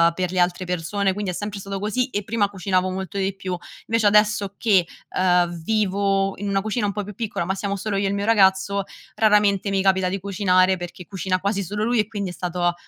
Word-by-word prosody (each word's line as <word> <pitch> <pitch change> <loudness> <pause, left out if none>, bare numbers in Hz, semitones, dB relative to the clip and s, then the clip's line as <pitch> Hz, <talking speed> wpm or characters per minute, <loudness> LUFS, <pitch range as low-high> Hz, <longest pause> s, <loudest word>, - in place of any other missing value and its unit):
per 180 0 -1
le 185 - -1
altre 175 +1 +1
persone, 185 +3 -1
quindi 205 -1 -3
è - - -2
sempre 205 +2 -5
stato 195 0 -5
così 220 +6 -1
e 205 -4 -2
prima 205 -1 0
cucinavo 185 -1 0
molto 190 +1 -5
di 195 0 -1
più. 185 -2 -4 0.3
Invece 225 -1 +2
adesso 210 -1 +3
che, 195 -6 +3 0.3
uhm, 175 -2 +2
vivo 195 -1 +1
in 205 0 -3
una 195 0 +1
cucina 215 +1 -1
un - - 0
po' 205 +1 -3
più 210 - -8
piccola, 205 -5 -3
ma 190 - 0
siamo 200 0 -3
solo 200 +1 -2
io 200 - 0
e - - 0
il 200 - -1
mio 200 - -2
ragazzo, 200 -2 +3 0.3
raramente 210 -2 +3
mi 195 -1 +1
capita 190 -1 +3
di 195 - -3
cucinare, 190 -1 +2
perché 175 0 -8
cucina 190 -1 -2
quasi 200 +1 -1
solo 205 +4 -3
lui 235 +1 +1
e 210 - +1
quindi 200 -4 -4
è - - -9
stato 175 -1 -1
195 Hz, 230 wpm, -23 LUFS, 185-205 Hz, 0.3 s, adesso